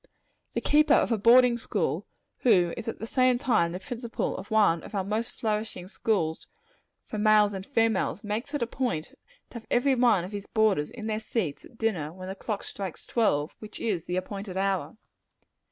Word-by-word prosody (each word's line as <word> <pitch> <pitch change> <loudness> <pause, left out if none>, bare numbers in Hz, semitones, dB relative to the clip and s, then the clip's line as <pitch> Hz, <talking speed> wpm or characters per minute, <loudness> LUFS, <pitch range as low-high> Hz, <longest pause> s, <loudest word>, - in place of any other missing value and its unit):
The - - 0
keeper 300 0 +4
of - - +2
a 230 - +3
boarding 240 +2 +6
house, - - -1 0.4
who 180 -8 +4
is - - -7
at 225 - -3
the - - -5
same 255 +1 +3
time 225 -11 +2
the 180 - -5
principal 240 0 -4
of 190 - -8
one 205 -7 +3
of 210 - -9
our 195 - 0
most 215 +4 -2
flourishing 215 -4 -3
schools 190 -6 -1 0.6
for 215 - -5
both - - -1
males 210 -1 +5
and 190 -1 -5
females, 225 - +1
makes 225 +8 -3
it 290 - 0
a - - +1
point 235 - -2 0.4
to 235 - -6
have 225 - -21
every 265 +3 +3
one 240 -7 +3
of 185 - -7
his 205 -1 -6
boarders 215 -9 +2
in 225 -3 -8
their 215 -1 -1
seats 215 -8 -3
at 235 - -17
dinner, 180 -10 -1
when 185 +2 -8
the - - -3
clock 205 +1 -4
strikes 190 -4 -6
twelve, 155 -10 +1
which 215 - -8
is 190 -8 -1
the 180 - -3
appointed 195 0 -5
hour. 190 -4 -1
215 Hz, 200 wpm, -27 LUFS, 190-235 Hz, 0.6 s, boarding